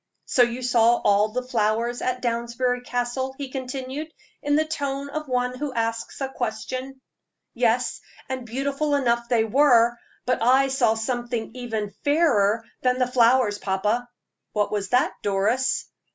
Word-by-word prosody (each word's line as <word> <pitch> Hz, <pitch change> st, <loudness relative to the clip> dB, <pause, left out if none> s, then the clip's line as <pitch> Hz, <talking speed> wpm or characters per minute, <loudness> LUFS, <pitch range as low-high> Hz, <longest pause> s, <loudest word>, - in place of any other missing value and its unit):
"So 255 Hz, -, +2 dB
you 240 Hz, +1 st, +1 dB
saw 240 Hz, -1 st, +4 dB
all 205 Hz, -2 st, +3 dB
the 250 Hz, +4 st, -3 dB
flowers 235 Hz, 0 st, 0 dB
at 255 Hz, 0 st, -2 dB
Downsbury 240 Hz, +1 st, -1 dB
Castle?" 245 Hz, +2 st, -2 dB
he 275 Hz, -2 st, -6 dB
continued, 265 Hz, +3 st, -5 dB, 0.3 s
in 290 Hz, 0 st, +1 dB
the 310 Hz, +1 st, +3 dB
tone 280 Hz, -3 st, -3 dB
of 305 Hz, 0 st, -4 dB
one 250 Hz, -1 st, 0 dB
who 295 Hz, -1 st, -2 dB
asks 230 Hz, 0 st, -2 dB
a 270 Hz, -, 0 dB
question. 255 Hz, +2 st, -4 dB, 0.5 s
"Yes, 245 Hz, 0 st, +1 dB, 0.3 s
and 260 Hz, -1 st, -4 dB
beautiful 275 Hz, +5 st, -1 dB
enough 235 Hz, -3 st, +1 dB
they 235 Hz, -3 st, +3 dB
were; 240 Hz, -1 st, +4 dB, 0.3 s
but 250 Hz, -2 st, 0 dB
I 260 Hz, +3 st, +4 dB
saw 260 Hz, -4 st, +2 dB
something 240 Hz, 0 st, -3 dB
even 225 Hz, -5 st, -4 dB
fairer 235 Hz, -9 st, +3 dB, 0.2 s
than 250 Hz, 0 st, +2 dB
the 255 Hz, -, +2 dB
flowers, 235 Hz, -3 st, +4 dB
papa." 210 Hz, +5 st, -1 dB, 0.4 s
"What 210 Hz, -1 st, 0 dB
was 200 Hz, -2 st, -2 dB
that, 250 Hz, +1 st, +2 dB
Doris?" 210 Hz, +7 st, +1 dB
245 Hz, 150 wpm, -24 LUFS, 230-265 Hz, 0.5 s, saw